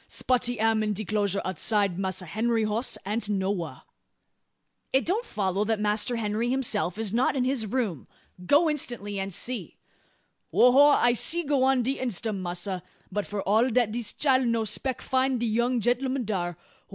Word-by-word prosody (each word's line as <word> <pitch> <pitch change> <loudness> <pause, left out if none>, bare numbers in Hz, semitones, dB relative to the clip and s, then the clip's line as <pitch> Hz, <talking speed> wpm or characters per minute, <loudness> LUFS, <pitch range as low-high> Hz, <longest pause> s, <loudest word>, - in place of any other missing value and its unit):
Spotty 245 -2 0
am 220 0 +2
in 210 -1 0
de 210 +2 -4
'closure 200 -1 -1
outside. 195 +1 +1
Massa 190 -1 -2
Henry 225 +6 0
hoss 215 +4 -1
ain't 210 +2 -2
nowha." 190 -8 -2 1.1
"It 265 - +2
don't 405 +8 0
follow 195 -1 -1
that 220 -1 0
Master 210 +3 0
Henry 225 +1 -1
himself 225 -9 0
is 220 -2 -2
not 245 +4 +2
in 260 - +1
his 255 -4 0
room. 205 - -2 0.4
Go 290 - +4
instantly, 240 -9 -2
and 195 0 -3
see!" 245 +7 -3 0.7
"Ho 250 - +6
ho! 280 +3 +7
I'se 245 +8 +2
go 280 -2 +2
on 265 -2 +3
de 265 +3 -2
instum, 225 -4 -2
massr; 180 +1 -3 0.3
but 205 +1 -2
f'r 205 -1 -4
all 220 +6 +3
dat 240 -2 +2
dis 235 -1 -3
chile 265 -3 +2
no 230 -2 0
speck 255 +5 -2
find 260 -1 +1
de 240 - -1
young 235 +2 +1
genl'um 250 +2 0
dar. 180 -4 -2
Ho! - - -24
225 Hz, 175 wpm, -26 LUFS, 200-255 Hz, 1.1 s, ho